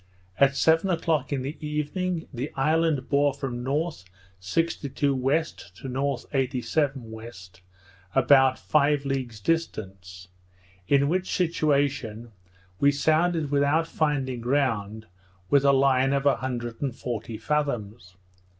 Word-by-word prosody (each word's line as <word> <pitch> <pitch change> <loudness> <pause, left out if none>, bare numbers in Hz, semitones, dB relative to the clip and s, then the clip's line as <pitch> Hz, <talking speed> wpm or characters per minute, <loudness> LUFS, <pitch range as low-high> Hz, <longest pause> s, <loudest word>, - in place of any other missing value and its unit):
At 140 0 +4
seven 165 +6 +3
o'clock 160 -5 0
in 135 -2 -1
the 145 +4 -6
evening, 160 +4 -2
the 130 +4 -4
island 155 0 +1
bore 140 -1 +2
from 125 -3 -4
north 145 - -2 0.4
62° 165 - -1
W., 140 +2 +2 0.3
to 135 - -9
north 135 0 -2
87° 135 +2 0
W., 115 -2 -9 0.9
about 135 -2 +5
five 145 -1 +1
leagues 130 -5 -3
distant; 95 - -3 0.6
in 140 0 +3
which 185 +4 -1
situation, 140 - 0 0.5
we 140 - +5
sounded 155 +1 +1
without 145 +3 +2
finding 140 -6 -1
ground 115 -5 -1 0.5
with 140 -1 +5
a 140 - +5
line 135 0 +3
of 140 0 0
an 140 - +4
hundred 120 -3 -5
and 135 -4 -2
forty 115 -3 -5
fathoms. 115 -8 -3
140 Hz, 125 wpm, -26 LUFS, 125-150 Hz, 0.9 s, about